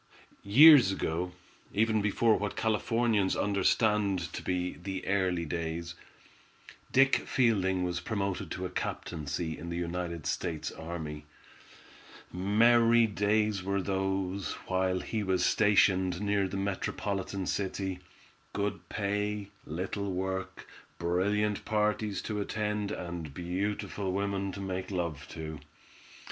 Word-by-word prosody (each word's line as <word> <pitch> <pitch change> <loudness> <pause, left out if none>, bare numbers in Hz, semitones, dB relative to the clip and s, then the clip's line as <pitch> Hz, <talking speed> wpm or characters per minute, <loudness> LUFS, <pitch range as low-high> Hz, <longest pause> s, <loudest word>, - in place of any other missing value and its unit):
Years 130 +1 +8
ago, 90 -1 -2 0.4
even 110 0 +3
before 110 +2 +3
what 105 0 -2
Californians 110 -2 +1
understand 100 -3 +1
to - - -4
be 90 0 -1
the 95 +1 -6
"early 95 -3 +1
days," 85 +1 -3 1.0
Dick 135 +1 +5
Fielding 95 -7 +2
was 90 -1 -1
promoted 100 0 -2
to 95 - -4
a 90 - -5
captaincy 80 0 -3
in 85 - -7
the 85 - -3
United 85 -2 -3
States 80 +2 -2
Army. 80 -3 -6 1.1
Merry 115 +5 +5
days 105 -1 +1
were 100 +2 -1
those, 95 0 -1
while 95 0 0
he 110 - -2
was 95 -2 +1
stationed 95 -4 +3
near 100 -1 +1
the 95 - -4
metropolitan 100 0 -2
city. 95 -1 -2 0.5
Good 100 -1 -3
pay, 105 0 -2 0.2
little 95 +5 -3
work, 95 +1 -3 0.3
brilliant 100 +5 0
parties 105 -2 0
to 105 -1 -2
attend, 105 0 -2
and 85 -5 -5
beautiful 95 +2 -2
women 100 0 -1
to 100 - -6
make 95 -1 -4
love 85 -6 -3
to. 80 -1 -6
95 Hz, 115 wpm, -30 LUFS, 90-105 Hz, 1.1 s, Years